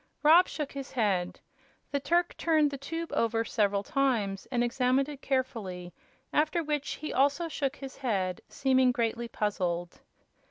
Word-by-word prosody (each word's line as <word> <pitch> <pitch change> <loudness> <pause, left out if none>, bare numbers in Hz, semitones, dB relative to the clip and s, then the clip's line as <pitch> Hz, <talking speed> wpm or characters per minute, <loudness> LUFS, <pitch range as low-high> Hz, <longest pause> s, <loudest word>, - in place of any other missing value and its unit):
Rob 330 +5 +7
shook 300 -3 -4
his 275 -1 -7
head. 195 -7 0 0.5
The 280 - 0
Turk 345 +4 +1
turned 310 -3 +2
the 280 - -4
tube 330 +4 -5
over 230 0 +1
several 200 -3 +1
times 235 -9 0
and 240 -2 +2
examined 255 +3 +2
it 290 -2 -8
carefully, 210 -10 -2 0.4
after 315 +3 +2
which 295 -2 -2
he 310 - -5
also 285 +5 +2
shook 285 -3 -2
his 270 -2 -9
head, 195 -8 -1
seeming 260 -1 +3
greatly 235 0 -1
puzzled. 180 -6 -2
260 Hz, 150 wpm, -29 LUFS, 210-290 Hz, 0.5 s, Rob